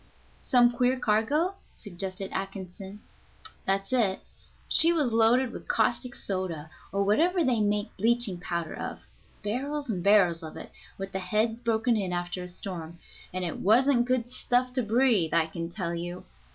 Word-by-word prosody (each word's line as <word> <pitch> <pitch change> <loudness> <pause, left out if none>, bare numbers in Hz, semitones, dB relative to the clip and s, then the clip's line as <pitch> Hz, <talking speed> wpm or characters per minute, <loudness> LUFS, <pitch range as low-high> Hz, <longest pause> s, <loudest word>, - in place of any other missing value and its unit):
"Some 245 -3 +4
queer 250 +1 +1
cargo?" 250 - +1 0.2
suggested 190 -1 -5
Atkinson. 195 +1 -6 0.7
"That's 195 +3 0
it. 210 -7 +2 0.5
She 330 - +6
was 295 -9 +1
loaded 230 +3 +4
with - - -9
caustic 250 -2 0
soda, 175 -5 -4 0.2
or 200 0 +1
whatever 335 - +3
they 250 -5 +2
make 205 +1 0
bleaching 225 -3 +2
powder 170 -2 -3
of - - -6 0.4
barrels 275 +5 -2
and 185 -4 -3
barrels 190 -4 +4
of 160 -1 -8
it, - - -9 0.3
with 195 0 -6
the 190 - -3
heads 225 +4 0
broke 230 0 -1
in 210 -6 +2
after 175 +1 -3
a 180 - -6
storm, 175 -2 -7 0.3
and 185 0 -3
it 170 - -4
wasn't 240 +4 +4
good 250 -2 +1
stuff 250 0 0
to 255 - +1
breathe, 220 -7 +2
I 165 -1 +4
can 165 +1 -5
tell 170 -2 -3
you. 175 +1 -5
210 Hz, 160 wpm, -28 LUFS, 185-245 Hz, 0.7 s, She